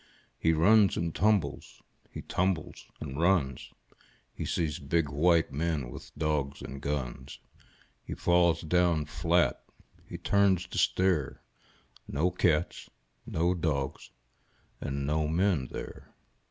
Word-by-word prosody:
He 80 - +3
runs 100 +5 +4
and 85 -1 -2
tumbles, 100 -7 0 0.3
he - - -8
tumbles 90 -3 -2
and 70 -1 -6
runs. 70 -9 +1 0.6
He - - -5
sees 80 -1 -1
big 85 -5 0
white 80 +3 +2
men 75 -4 -2
with - - -10
dogs 75 -3 -1
and 70 0 -8
guns. 65 -2 -4 0.7
He - - -6
falls 85 -1 +3
down 85 -1 +2
flat. 85 +3 +1 0.5
H)e - - -6
turns 100 -3 +2
to - - -2
stare 90 -7 +1 0.3
— - - -30
No 90 +5 +2
cats, 85 -2 0 0.4
no 85 +3 +1
dogs, 75 -6 -2 0.7
and 70 0 -3
no 75 +1 0
men 85 -4 +1
there. - - -9
80 Hz, 125 wpm, -29 LUFS, 70-90 Hz, 0.7 s, runs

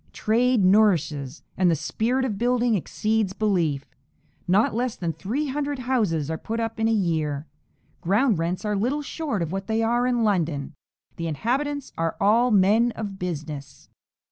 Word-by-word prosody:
Trade 235 -1 +2
nourishes, 170 -9 +2
and 185 -1 +3
the 165 - +3
spirit 245 - -1
of 210 -6 -3
building 245 -1 +2
exceeds 215 +1 0
belief. 175 -10 0 0.6
Not 195 +5 +3
less 245 +1 -1
than 170 -3 -3
three 230 - -3
hundred 285 +1 -2
houses 210 - 0
are 160 - -3
put 225 +1 -4
up 225 0 -3
in 225 - +2
a - - +2
year. 160 -8 0 0.6
Ground 200 +3 +2
rents 175 +5 -2
are 210 0 0
little 255 +9 0
short 280 - -3
of 165 - -4
what 195 0 -4
they 225 +1 +1
are 240 +2 +2
in 245 -2 +1
London. 165 -8 0 0.4
The 165 - -3
inhabitants 270 - -2
are 165 0 0
all 225 +5 +4
men 215 +3 +4
of 200 -3 -6
business." 155 -5 -6
210 Hz, 165 wpm, -24 LUFS, 170-240 Hz, 0.6 s, all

